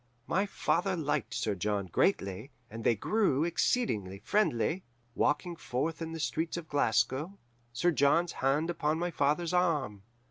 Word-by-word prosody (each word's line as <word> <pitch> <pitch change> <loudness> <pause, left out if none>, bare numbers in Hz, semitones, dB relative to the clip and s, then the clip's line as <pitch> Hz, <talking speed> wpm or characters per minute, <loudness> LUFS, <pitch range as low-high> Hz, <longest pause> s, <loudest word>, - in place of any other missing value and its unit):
"My 190 +8 +1
father 185 0 0
liked 140 - -2
Sir 105 - 0
John 100 +1 -1
greatly, 100 - 0 0.2
and 115 +1 -7
they 115 - +3
grew 175 - +1
exceedingly 165 - 0
friendly, 170 - 0 0.3
walking 160 +7 0
forth 155 +2 -3
in 165 0 -4
the 165 - -5
streets 160 +2 -1
of 170 -2 -6
Glasgow, 145 - +1 0.3
Sir 175 +9 +2
John's 165 +4 +3
hand 145 +6 +2
upon 155 -2 0
my 175 +1 -1
father's 155 +4 +1
arm. 150 - +1
155 Hz, 145 wpm, -31 LUFS, 120-175 Hz, 0.3 s, they